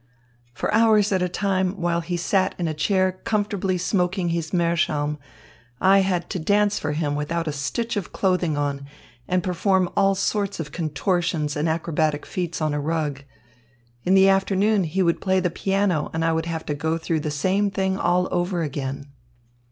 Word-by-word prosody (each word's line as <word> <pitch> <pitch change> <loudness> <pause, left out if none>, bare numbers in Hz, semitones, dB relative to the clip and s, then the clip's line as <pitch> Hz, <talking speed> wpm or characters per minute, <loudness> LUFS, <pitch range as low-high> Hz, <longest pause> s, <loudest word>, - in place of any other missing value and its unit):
"For - - -2
hours 215 -2 +4
at 190 -2 +1
a 180 - 0
time, 190 0 -1
while 170 -1 0
he 175 +1 -3
sat 185 +2 +1
in 175 - -1
a 155 - -1
chair 185 +4 +1
comfortably 205 -3 0
smoking 180 -1 0
his 165 -1 -2
meerschaum, 160 -4 0 0.6
I 195 +1 +5
had 185 -3 0
to 185 - -2
dance 205 +4 +2
for 150 0 -2
him 150 -1 -1
without 165 +3 -2
a - - 0
stitch 150 +13 -3
of 200 -5 -4
clothing 180 -5 0
on 140 -1 -2 0.4
and 185 0 +1
perform 185 0 +1
all 195 -1 +3
sorts 200 0 -1
of 150 -3 -5
contortions 165 -1 -1
and 155 +2 0
acrobatic 160 -2 0
feats 175 -3 -4
on 155 -1 0
a 145 - -1
rug. 150 -2 -2 0.8
In 185 - +3
the 195 0 +6
afternoon 195 +1 +2
he 185 +4 0
would 170 -1 +1
play 190 -1 +2
the 180 -2 0
piano 190 -4 0
and 165 0 0
I 165 - +2
would 160 +1 -1
have 165 -1 -4
to 150 - -2
go 160 +3 -1
through 165 -1 -1
the 150 - -3
same 190 +7 +1
thing 190 0 -1
all 180 +1 +2
over 175 -1 0
again." 140 -1 -4
175 Hz, 185 wpm, -23 LUFS, 155-190 Hz, 0.8 s, the